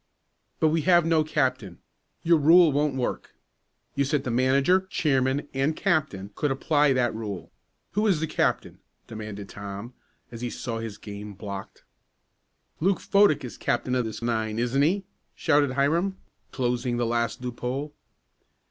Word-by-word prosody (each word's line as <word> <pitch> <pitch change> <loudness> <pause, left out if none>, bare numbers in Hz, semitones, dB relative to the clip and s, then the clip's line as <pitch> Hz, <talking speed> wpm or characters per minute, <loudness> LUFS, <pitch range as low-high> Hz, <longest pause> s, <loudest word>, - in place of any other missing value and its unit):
"But 160 - +4
we 160 +1 +1
have 175 0 +4
no 165 -1 +3
captain 130 - -1 0.5
your 165 -1 +4
rule 165 +2 +6
won't 145 0 +1
work. 125 -2 -3 0.6
You 140 - +1
said 145 +1 0
the 125 - -2
manager, 135 +10 +3
chairman 135 -3 +1
and 135 +4 0
captain 155 - -1
could 150 - -1
apply 145 +2 +2
that 125 -2 +1
rule. 105 -4 -6 0.4
Who 210 +4 +1
is 185 -7 +3
the 160 - 0
captain?" - - -1 0.3
demanded 105 -2 -7
Tom, 100 +4 -8 0.4
as 115 -1 -8
he 120 - -2
saw 115 -1 -4
his 110 -2 -6
game 105 0 -8
blocked. 100 -1 -8 1.0
"Luke 190 +4 +2
Fodick 195 -9 +3
is 120 - -9
captain 125 +1 -1
of 125 -2 +1
this 110 +1 -6
nine; 110 -2 -1
isn't 120 +4 +1
he?" 185 +7 +2 0.3
shouted 145 -4 +2
Hiram, 165 +8 +1 0.3
closing 125 -1 -1
the 120 - 0
last 115 +1 -1
loophole. 125 +4 -4
130 Hz, 150 wpm, -26 LUFS, 115-155 Hz, 1.0 s, rule